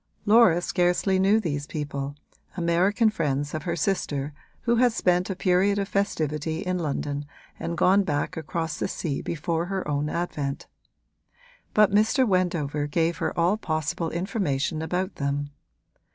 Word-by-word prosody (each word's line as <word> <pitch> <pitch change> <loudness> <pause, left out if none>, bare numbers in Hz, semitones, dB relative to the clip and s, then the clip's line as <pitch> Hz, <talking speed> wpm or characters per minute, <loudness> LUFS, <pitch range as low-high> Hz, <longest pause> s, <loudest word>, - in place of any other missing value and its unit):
Laura 210 -5 +6
scarcely 180 +2 +1
knew 200 +3 +4
these 145 -7 -3
people, 140 -2 -4 0.4
American 180 +6 +2
friends 145 -6 -1
of 155 - -2
her 170 - 0
sister 150 -5 -1 0.3
who 235 -1 +2
had 245 0 +4
spent 180 -3 +1
a 190 - -2
period 190 +2 +2
of 200 -1 -1
festivity 160 -5 -1
in 185 -2 -1
London 145 -2 -2 0.4
and 170 0 -3
gone 195 +2 +5
back 145 -6 -1
across 160 +1 -3
the - - 0
sea 145 -6 -3
before 165 +1 -2
her 190 -3 -3
own 145 0 -1
advent; 150 -5 -3 1.1
but 210 -2 +5
Mr. 220 +6 +3
Wendover 165 -6 0
gave 165 +3 0
her - - -2
all 175 +5 +3
possible 160 -3 -2
information 170 -5 -1
about 180 +4 -2
them. 145 0 -2
170 Hz, 145 wpm, -26 LUFS, 150-195 Hz, 1.1 s, Laura